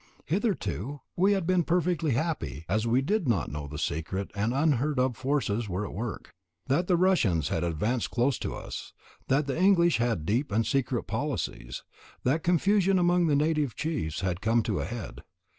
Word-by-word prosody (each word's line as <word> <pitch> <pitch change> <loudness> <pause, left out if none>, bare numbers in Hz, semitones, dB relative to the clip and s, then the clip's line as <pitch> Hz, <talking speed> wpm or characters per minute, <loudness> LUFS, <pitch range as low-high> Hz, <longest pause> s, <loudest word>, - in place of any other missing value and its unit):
Hitherto 145 - -1 0.2
we 195 +3 +4
had 190 -4 0
been 180 0 +3
perfectly 170 -3 +1
happy, 140 - -2
as 110 +5 0
we 125 +3 +3
did 200 +2 0
not 105 -10 +1
know 75 0 -5
that 75 +1 -7
secret 80 +7 -3
and 105 +3 0
unheard 145 0 +1
of 125 -1 +1
forces 125 -5 -1
were 95 +3 -2
at - - -7
work, 115 +3 -5 0.3
that 160 +7 +1
the 180 - +3
Russians 115 - +2
had 80 - -1
advanced 105 +9 -1
close 125 +3 +1
to - - -4
us, - - -7 0.3
that 140 +3 +2
the 135 - -2
English 175 -3 +5
had 115 -9 0
deep 115 - 0
and 110 +2 +2
secret 135 +2 0
policies, - - -3 0.4
that 145 +6 +2
confusion 190 +3 +3
among 175 -1 +3
the 150 - +3
native 150 -4 +1
chiefs 150 - -2
had 95 -1 -2
come 115 +1 +2
to - - -1
a - - -2
head. 120 -1 -6
130 Hz, 180 wpm, -28 LUFS, 105-170 Hz, 0.4 s, English